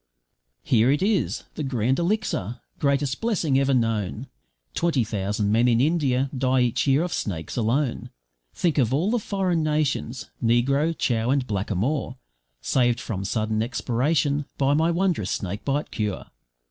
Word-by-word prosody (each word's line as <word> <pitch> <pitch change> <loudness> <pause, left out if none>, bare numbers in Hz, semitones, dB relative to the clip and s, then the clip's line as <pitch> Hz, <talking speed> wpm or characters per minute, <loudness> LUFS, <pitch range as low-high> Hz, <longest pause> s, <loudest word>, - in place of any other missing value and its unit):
`Here 120 +2 +4
it 145 +5 +1
is, 205 -1 0
the - - -5
Grand 130 -1 0
Elixir, 170 - -1 0.2
greatest 140 -2 0
blessing 170 - +1
ever 135 0 +2
known, 115 -1 -1 0.5
Twenty 165 -8 +1
thousand 105 -1 -1
men 115 +3 +3
in 115 -1 +3
India 140 -3 +2
die 130 0 +2
each 120 +3 +1
year 140 +4 +4
of 180 - -3
snakes 85 -6 -4
alone. 120 +3 0 0.4
Think 165 -4 0
of 130 0 +2
all 175 +9 +1
the 240 - +2
foreign 190 -5 0
nations, 150 -5 -1
negro, 140 +8 +2
chow, 115 -1 0
and 135 -1 +2
blackamoor, 110 - -2 0.4
Saved 120 - +2
from 100 -5 -4
sudden 110 +1 -1
expiration, 140 +5 0
by 140 0 +2
my 160 +3 +2
wondrous 170 - 0
snakebite 120 +10 -2
cure. 105 -3 -3
130 Hz, 145 wpm, -24 LUFS, 115-150 Hz, 0.5 s, `Here